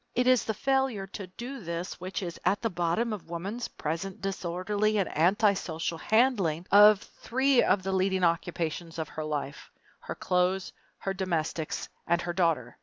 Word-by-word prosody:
It 250 - +2
is 255 -2 +4
the 220 - -2
failure 265 -5 0
to 195 0 -8
do 245 +9 -7
this 170 -1 -5
which 185 +2 -4
is 170 -2 -6
at 200 - +2
the 225 - 0
bottom 175 +7 0
of 200 -5 -8
woman's 195 +8 -4
present 170 +5 -4
disorderly 195 +3 -1
and 195 - +1
antisocial 175 -2 +1
handling 205 -9 +2
of 210 0 +8
three 260 +1 +1
of 185 0 +2
the 190 - -2
leading 190 0 +1
occupations 170 -1 -1
of 160 - -3
her 155 - -5
life 145 -2 -4 0.3
her - - -6
clothes, 180 +1 0 0.2
her 195 - -3
domestics, 170 -4 -2 0.2
and 170 0 +3
her 175 - -3
daughter. 165 -9 0
185 Hz, 165 wpm, -28 LUFS, 170-210 Hz, 0.3 s, of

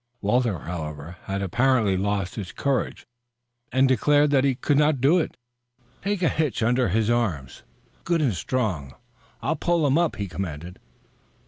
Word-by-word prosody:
Walter, 115 -1 +1
however, 80 0 -6
had 100 0 -3
apparently 115 0 +2
lost 100 0 -1
his 100 -5 -6
courage 140 -3 -2 0.7
and 130 +1 +4
declared 145 +4 +3
that 135 -2 +4
he 135 -2 +2
could 145 +3 +1
not 150 -2 +3
do 145 +8 +4
it. 160 - -3 0.6
"Take 200 -1 -1
a - - +4
hitch 150 -7 0
under 125 +2 +2
his 110 +4 +1
arms, 90 - -1 0.4
good 170 -1 +1
and 135 -8 +1
strong. 90 - -2 0.5
I'll 150 +6 0
pull 170 0 +1
him 145 +3 +3
up," 170 -2 +1
he 100 -1 -4
commanded. 90 -2 -6
120 Hz, 155 wpm, -24 LUFS, 95-145 Hz, 0.7 s, and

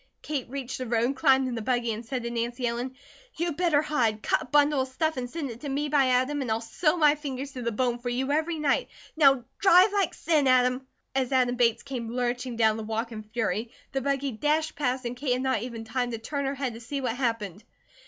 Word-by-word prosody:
Kate 280 -5 -3
reached 265 -1 -5
the 255 - -4
road, 235 +3 +1
climbed 265 0 +4
in 250 - -3
the 230 - -3
buggy, 240 0 0
and 220 +2 -6
said 250 +1 -4
the 235 - -3
Nancy 240 +2 -2
Ellen: 240 +2 -2 0.4
"You'd 340 -2 -2
better 330 -4 +2
hide! 230 -8 0
Cut - - +2
a - - -6
bundle 290 +1 +3
of 260 - -2
stuff 315 +5 -1
and 250 -1 -4
send 290 -3 -4
it 230 +1 -11
to 290 - -5
me 290 +2 -1
by 280 -2 +4
Adam 255 +3 +1
and 255 - -3
I'll 220 0 +1
sew 305 +8 0
my 300 -3 +5
fingers 280 -2 -5
to 255 - -7
the 235 -1 -1
bone 240 +1 0
for 245 0 -4
you 260 +3 -1
every 320 +2 0
night. 295 -2 +1 0.3
Now 275 -5 +5 0.2
drive 385 +1 +6
like 395 -5 +1
sin, 305 -4 +2
Adam!" 255 0 +3 0.3
As 265 -1 0
Adam 250 -2 +3
Bates 235 -2 +2
came 250 -5 -5
lurching 245 0 -2
down 220 -1 +3
the 220 - -5
walk 225 +2 -3
in 215 -1 -6
fury 220 0 -2 0.2
the 270 - -1
buggy 275 0 -1
dashed 300 +7 0
past 255 -3 -1
and 240 +1 -3
Kate 250 0 0
had 255 +1 -1
not 260 -5 +1
even 235 -2 -6
time 245 +2 -2
to 230 - -3
turn 280 +5 -3
her 270 +1 -1
head 265 -3 -2
to 225 - -9
see 275 +5 -4
what 250 -4 -2
happened. 225 -6 -2
255 Hz, 240 wpm, -27 LUFS, 235-280 Hz, 0.4 s, drive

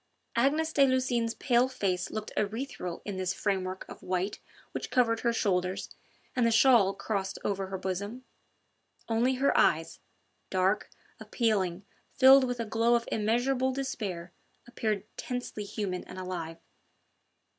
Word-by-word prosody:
Agnes 300 +6 +2
de 280 - +2
Lucines' 250 -3 +1
pale 245 -1 +3
face 190 -8 -1
looked 215 -1 -5
ethereal 210 -5 -3
in 200 -3 -4
this 185 0 -1
framework 190 -2 -2
of - - -11
white 185 +2 -2 0.3
which - - -5
covered 230 -3 +2
her 235 - +1
shoulders 185 -4 -1 0.4
and 250 - +2
the 230 - +4
shawl 225 -4 +5
crossed 195 -2 -3
over 195 -1 -1
her 190 0 -4
bosom: 200 +7 -4 0.8
only 235 +3 +2
her 275 +2 +2
eyes, - - +2 0.5
dark, 190 +2 +1 0.3
appealing, 195 -6 0 0.3
filled 265 0 +8
with 245 -1 -3
a 230 - -1
glow 230 +2 +2
of 235 -1 -1
immeasurable 245 +5 +1
despair, 205 -10 -4 0.3
appeared 215 -4 -2
tensely 245 -4 -4
human 195 -3 -3
and 185 - -10
alive. 175 -3 -5
215 Hz, 135 wpm, -29 LUFS, 190-245 Hz, 0.8 s, filled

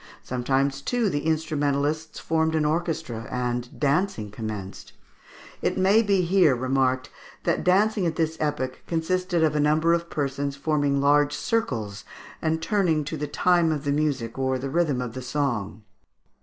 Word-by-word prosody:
Sometimes, 135 +2 0
too, 235 - 0
the 145 +2 -2
instrumentalists 155 -1 0
formed 160 0 0
an 155 -1 +1
orchestra, 155 -7 -2
and 125 -1 -3
dancing 140 - 0
commenced. 105 -3 -7 0.7
It - - 0
may 195 +4 +5
be 200 -4 +2
here 175 -6 +4
remarked 130 0 0 0.3
that - - 0
dancing 200 +1 +3
at 160 - -2
this 160 -1 0
epoch 145 -4 -2
consisted 175 +1 0
of 155 -1 +2
a - - +2
number 155 +3 +3
of 170 0 -1
persons 140 -1 -2
forming 145 -1 +1
large 145 +1 +3
circles, 125 - -2 0.4
and 160 0 0
turning 180 -8 +1
to 155 +2 -4
the 150 -1 -3
time 170 +2 +2
of 150 -2 -2
the 145 - 0
music 140 -5 -1
or 130 0 +1
the 135 +1 -4
rhythm 155 -6 +1
of 120 -2 -6
the 130 - -6
song. 120 -6 -2
150 Hz, 155 wpm, -25 LUFS, 130-165 Hz, 0.7 s, may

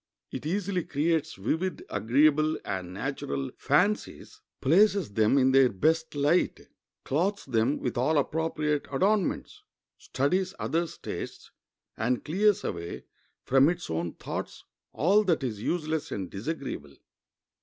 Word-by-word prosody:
It - - -5
easily 185 0 -1
creates 155 +2 0
vivid, 160 - -2
agreeable, 155 +6 +3
and 90 -2 -4
natural 135 +5 -3
fancies, 205 - 0 0.2
places 190 - +3
them 110 +5 +3
in 130 -1 +4
their 135 -1 +6
best 160 - 0
light, 145 +5 +2 0.4
clothes 190 +9 0
them 125 +2 +1
with 120 -1 -3
all 150 +5 +2
appropriate 150 0 0
adornments, 195 +7 0 0.4
studies 185 +7 -1
others' 165 0 -2
tastes, - - -7 0.5
and 120 +3 -1
clears 205 +5 +2
away 85 0 -5 0.4
from 135 +3 +5
its 175 - -4
own 85 +1 -2
thoughts - - -6 0.3
all 195 +8 +3
that 165 -6 +1
is 110 -5 -3
useless 155 +2 -2
and 95 -3 -4
disagreeable. 105 - -5
150 Hz, 125 wpm, -28 LUFS, 125-175 Hz, 0.5 s, their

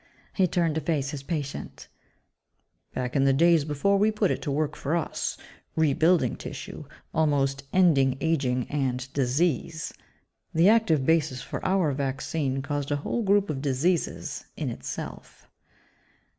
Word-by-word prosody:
He 190 -2 +3
turned 170 -2 +1
to 160 - -1
face 145 -2 -1
his 145 -3 -5
patient, 145 -2 -5 1.1
"Back 125 -1 -3
in 135 -1 +3
the 135 - +4
days 165 +1 +4
before 160 +7 +1
we 210 +2 +4
put 210 -3 +1
it - - -2
to 150 - -3
work 150 +1 -1
for 145 +4 -1
us 170 - -2 0.4
rebuilding 160 -2 +3
tissue, - - -7 0.3
almost 140 -3 +1
ending 140 -8 +4
aging 135 -6 0
and 130 -2 -2
disease 145 +3 0 0.6
the 170 +5 +6
active 190 -12 +3
basis 155 -5 +1
for - - -6
our 185 -5 +2
vaccine 135 0 -2
caused 145 -1 -3
a 145 - +1
whole 240 - 0
group 205 -1 +3
of 135 -3 -4
diseases, 150 +5 -1
in - - -2
itself." - - -7
150 Hz, 145 wpm, -26 LUFS, 135-170 Hz, 1.1 s, the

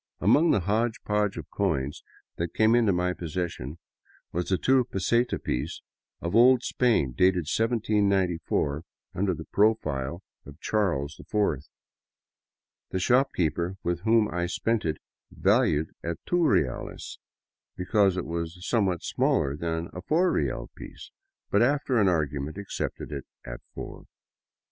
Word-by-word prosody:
Among 145 - +4
the 100 - +3
hodgepodge 105 0 0
of - - -8
coins 75 -9 -1 0.3
that 85 0 -3
came 110 +1 +4
into 115 -4 +4
my 90 0 0
possession 80 -4 -4 0.5
was 90 +2 -3
a 95 - +3
two 130 +4 +3
peseta 120 +2 +1
piece 70 +6 -3 0.4
of 85 - -2
old 125 +1 +6
Spain, 115 - +2
dated 90 +4 +2
1794 100 - +1 0.3
under 95 0 0
the - - -8
profile 85 -7 0 0.2
of 70 0 -13
Charles 80 -9 -1
IV. 80 -10 -1 1.2
The - - -2
shopkeeper 95 - +1
with 85 0 -1
whom 110 +2 +3
I 90 0 -1
spent 115 +4 -1
it 80 -1 -1 0.3
valued 75 +2 +2
it - - -8
at 85 - -6
two 175 -1 +2
reales 65 - -1 0.6
because 95 0 +2
it 90 - -2
was 85 +2 -5
somewhat 95 -7 +1
smaller 70 - +1
than 80 +1 -3
the 90 - -6
four 170 - +2
real - - -2
piece, - - -11 0.4
but - - +4
after 135 -1 +2
an 100 - +4
argument 75 -2 -1
accepted 100 -6 -5
it 70 -2 -5 0.2
as - - -7 0.2
four. - - -8
90 Hz, 135 wpm, -27 LUFS, 80-110 Hz, 1.2 s, old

